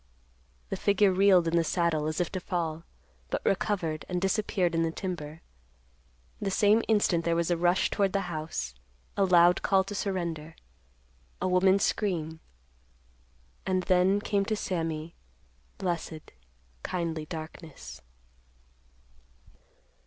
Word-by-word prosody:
_ - - -36
The - - -2
figure 200 -1 +3
reeled 185 -2 +5
in 165 - +1
the 170 - +4
saddle, 165 -2 0
as 155 0 -2
if 175 - -1
to 185 - -3
fall, 165 -3 -3 0.4
but - - -3
recovered, 180 -6 0
and 180 -1 -1
disappeared 190 -2 0
in 165 - +1
the 165 - +1
timber. 160 -3 -6 1.0
The 200 - -1
same 210 +3 +4
instant 205 -6 +2
there 170 0 +1
was 170 +1 0
a - - +3
rush 175 +2 +2
toward 200 -2 +1
the 200 - 0
house—a 65 - -5
loud 175 -1 +5
call 195 -1 +3
to 195 - -7
surrender—a 65 - -6
woman's 190 +2 +4
scream—and 65 - -5
then, 185 +2 +3
came 200 -1 +1
to 215 - 0
Sammy, 165 -5 -3 0.6
blessed, 170 -4 -4 0.5
kindly 165 - -3
darkness. 155 - -9
170 Hz, 125 wpm, -28 LUFS, 155-190 Hz, 1.0 s, reeled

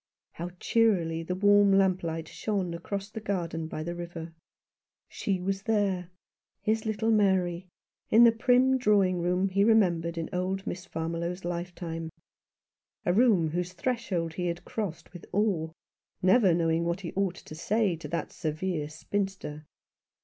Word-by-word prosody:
How 170 +2 -6
cheerily 180 -8 +2
the 180 +2 -3
warm 205 +1 +5
lamplight 175 -4 +1
shone 195 -4 -2
across 195 +4 -4
the 220 - -5
garden 170 -6 -3
by 155 -1 -5
the 170 +2 -4
river. 170 -1 -7 0.7
She 195 -2 -2
was 195 +1 -2
there, 195 -5 0 0.5
his 220 +1 0
little 220 +1 0
Mary, 190 -4 +2 0.4
in 230 +2 +7
the 235 - +8
prim 250 +3 +3
drawing 195 -6 +3
room 180 +2 +1
he 195 +1 +2
remembered 175 -6 +3
in 165 - -2
old 190 +2 -2
Miss 185 +1 -5
Farmiloe's 170 +2 -3
lifetime; 170 -2 -4 1.0
a 175 - +3
room 200 -7 +4
whose 175 +3 -3
threshold 185 -7 -2
he 180 +1 -2
had 170 0 -4
crossed 195 -7 -5
with 175 - -11
awe, 195 -6 +1 0.5
never 190 -1 +4
knowing 165 -1 +1
what 170 +3 -1
he 170 - -6
ought 195 -2 0
to 155 - -11
say 200 +3 +1
to 155 - -8
that 170 +3 -3
severe 155 -1 -3
spinster. 185 -4 -4
180 Hz, 150 wpm, -28 LUFS, 170-205 Hz, 1.0 s, the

